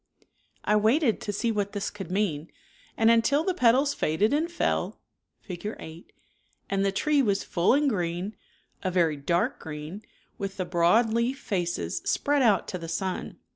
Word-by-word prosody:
I 210 Hz, -, +3 dB
waited 225 Hz, +3 st, +2 dB
to 205 Hz, -, -3 dB
see 225 Hz, +3 st, -1 dB
what 205 Hz, -2 st, -2 dB
this 205 Hz, -1 st, -3 dB
could 195 Hz, -4 st, -8 dB
mean, 180 Hz, -6 st, -1 dB, 0.5 s
and 225 Hz, 0 st, +5 dB
until 230 Hz, +6 st, +3 dB
,..M„..i -, -, -5 dB
the 375 Hz, -, +1 dB
petals 270 Hz, -1 st, +3 dB
faded 205 Hz, -, +1 dB
and 320 Hz, +4 st, 0 dB
fell 345 Hz, -, -1 dB, 0.4 s
(Fig. 200 Hz, +3 st, -6 dB
8) 160 Hz, +2 st, -11 dB, 0.6 s
and 195 Hz, 0 st, +1 dB
the 195 Hz, -, +2 dB
tree 290 Hz, +8 st, +2 dB
was 200 Hz, -6 st, +1 dB
full 175 Hz, +8 st, +2 dB
and 290 Hz, +1 st, +2 dB
green, 180 Hz, -2 st, -2 dB, 0.5 s
a 185 Hz, -, -1 dB
very 170 Hz, -4 st, +2 dB
dark 170 Hz, +5 st, 0 dB
green, 155 Hz, +5 st, -7 dB, 0.4 s
with 195 Hz, -1 st, -4 dB
the 185 Hz, -, -2 dB
broad 180 Hz, +8 st, +3 dB
leaf 235 Hz, +4 st, 0 dB
faces 175 Hz, -8 st, -2 dB
spread 290 Hz, 0 st, +1 dB
out 215 Hz, -7 st, +3 dB
to 185 Hz, -, -4 dB
the 165 Hz, -, -7 dB
sun. 185 Hz, +3 st, -3 dB
205 Hz, 175 wpm, -27 LUFS, 175-235 Hz, 0.6 s, and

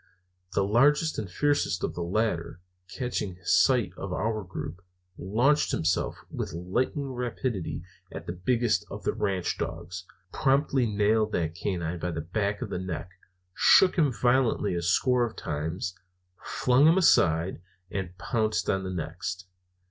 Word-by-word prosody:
The 100 Hz, -, +2 dB
largest 145 Hz, +10 st, +3 dB
and 105 Hz, -4 st, -5 dB
fiercest 145 Hz, +10 st, 0 dB
of -, -, -1 dB
the 90 Hz, -, -5 dB
latter, 90 Hz, -2 st, -1 dB, 0.3 s
catching 105 Hz, -2 st, -3 dB
sight 120 Hz, 0 st, +3 dB
of 95 Hz, 0 st, -6 dB
our 110 Hz, +3 st, -1 dB
group, 90 Hz, -1 st, -7 dB, 0.3 s
launched 120 Hz, +12 st, +2 dB
himself 80 Hz, +2 st, 0 dB
with -, -, -4 dB
lightning 125 Hz, -, -1 dB
rapidity 120 Hz, -7 st, -3 dB, 0.3 s
at -, -, -7 dB
the 85 Hz, -, -4 dB
biggest 115 Hz, +6 st, +1 dB
of -, -, -7 dB
the -, -, 0 dB
ranch 95 Hz, -3 st, -1 dB
dogs, 85 Hz, +2 st, -5 dB, 0.3 s
promptly 135 Hz, -2 st, +2 dB
nailed 105 Hz, +1 st, +2 dB
that 80 Hz, -2 st, 0 dB
canine 85 Hz, -2 st, -3 dB
by 90 Hz, -, -2 dB
the 80 Hz, -2 st, -3 dB
back 100 Hz, +5 st, -2 dB
of -, -, -7 dB
the -, -, -2 dB
neck, 90 Hz, -1 st, -5 dB, 0.4 s
shook 185 Hz, -, +6 dB
him 155 Hz, -7 st, +3 dB
violently 120 Hz, -2 st, +2 dB
a 85 Hz, -, -1 dB
score 125 Hz, +8 st, +2 dB
of 120 Hz, -, -3 dB
times, 80 Hz, +5 st, -3 dB, 0.5 s
flung 130 Hz, +4 st, +3 dB
him 165 Hz, +3 st, +5 dB
aside, 85 Hz, -, +3 dB, 0.3 s
and 90 Hz, -2 st, -4 dB
pounced 110 Hz, +3 st, 0 dB
on 95 Hz, 0 st, -1 dB
the 95 Hz, -, -4 dB
next. 90 Hz, +1 st, -4 dB
100 Hz, 150 wpm, -27 LUFS, 90-125 Hz, 0.5 s, shook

